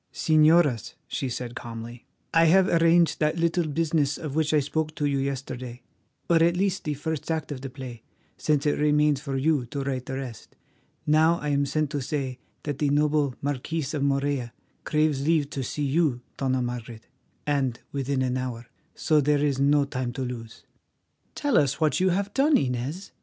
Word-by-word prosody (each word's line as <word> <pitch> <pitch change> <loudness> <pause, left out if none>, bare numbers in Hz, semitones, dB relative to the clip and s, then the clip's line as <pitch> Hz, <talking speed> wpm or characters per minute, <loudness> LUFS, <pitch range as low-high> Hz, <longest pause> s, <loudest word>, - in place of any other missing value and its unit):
"Señoras," 155 -6 +3
she 135 - -3
said 125 0 -5
calmly, 120 0 -8 0.3
"I 165 0 +5
have 185 +3 +5
arranged 170 0 +4
that 155 +2 +1
little 170 0 +1
business 150 -2 0
of 150 -4 -5
which 155 0 +1
I 155 - +4
spoke 155 +2 -2
to 145 - -1
you 140 -1 +1
yesterday, 130 -2 -4 0.4
or 170 - +4
at 170 +1 +3
least 195 0 0
the 150 -1 -1
first 160 +2 -4
act 160 -2 -2
of 135 -3 -5
the 135 - -5
play, 130 -3 -9 0.3
since 150 -2 0
it 145 - +1
remains 150 -1 +3
for 140 -3 -3
you 140 -2 +1
to 140 +3 -4
write 130 -2 -3
the 130 - -3
rest. 130 -6 -8 0.5
Now 160 +3 +4
I 150 - -4
am 140 0 +1
sent 155 0 -1
to 145 -2 -2
say 130 -2 -3 0.2
that 145 -2 -4
the 145 - +2
noble 145 -2 +2
Marquis 145 +3 -2
of 145 - -2
Morella 140 -3 0 0.3
craves 150 -3 +1
leave 150 -2 +1
to 135 - -3
see 145 +3 -3
you, 140 -3 +1
Dona 130 -2 0
Margaret, 120 -2 -6 0.4
and 135 -5 0
within 135 -1 -1
an 130 0 0
hour. 125 -2 -4 0.3
So 155 -1 +2
there 145 +1 +2
is 140 -2 0
no 140 +1 +4
time 130 -3 -3
to 130 - -3
lose." 115 -3 -7 0.7
"Tell 290 -4 +2
us 140 -1 0
what 155 +1 +2
you 185 +1 +3
have 200 +3 -1
done, 290 +2 +4
Inez?" 135 +8 -3
145 Hz, 185 wpm, -26 LUFS, 130-155 Hz, 0.7 s, I